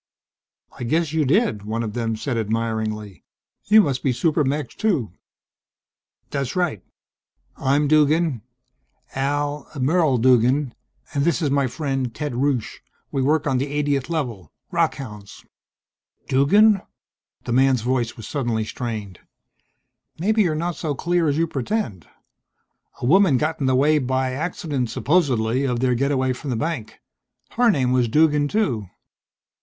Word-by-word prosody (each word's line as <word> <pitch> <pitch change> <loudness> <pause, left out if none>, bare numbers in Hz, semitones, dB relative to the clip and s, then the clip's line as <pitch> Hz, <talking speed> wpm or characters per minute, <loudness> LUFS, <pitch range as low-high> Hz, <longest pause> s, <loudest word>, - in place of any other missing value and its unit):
"I - - -4
guess 155 +5 0
you 160 -2 +1
did," 140 - +2
one 110 +3 -3
of 105 -2 -4
them 115 -1 -2
said, 120 +3 -3
admiringly. 110 -2 -3 0.4
"You 215 +1 +7
must 140 -8 -1
be 135 - +1
super 150 +5 +1
mechs 140 0 -2
too?" 165 - 0 1.2
"That's 140 -3 -3
right. 175 - -1 0.7
I'm 145 +2 +1
Duggan, 155 -3 +3 0.7
Al 145 +2 -2
Merle 150 0 +2
Duggan, 125 +2 +3 0.4
and 140 - +1
this 165 -4 +1
is 150 -4 0
my 140 -1 +2
friend, 135 -3 -3
Ted 150 -3 -3
Rusche. 130 -2 -1 0.3
We 135 - -1
work 150 +3 +2
on 135 -3 +1
the 140 - -1 0.2
80th 140 -1 -1
Level 120 - -3 0.2
rockhounds." 130 -11 -3 0.8
"Duggan?" 195 +10 +4 0.6
The 120 - -3
man's 130 -1 +3
voice 125 -2 -1
was 115 - -8
suddenly 120 -6 -1
strained. 110 -6 -5 1.0
"Maybe 215 +6 +2
you're 170 -6 +1
not 170 +2 -2
so 150 -4 -3
clear 175 +2 0
as 145 0 +1
you 165 - +2
pretend. 135 - -3 0.9
A - - -2
woman 175 0 +5
got 155 +4 -1
in 135 - 0
the 130 - +3
way 150 +3 +3
by 130 0 -1
accident, 145 -4 -3
supposedly, 130 -7 +1
of 125 -3 -1
their 125 0 +2
getaway 130 0 +1
from 135 +3 -7
the 125 - -1
bank. 115 -5 -4 0.5
Her 245 0 +3
name 130 - +2
was 125 -2 +2
Duggan 150 +3 +3
too." 135 - -1
135 Hz, 145 wpm, -22 LUFS, 120-155 Hz, 1.2 s, You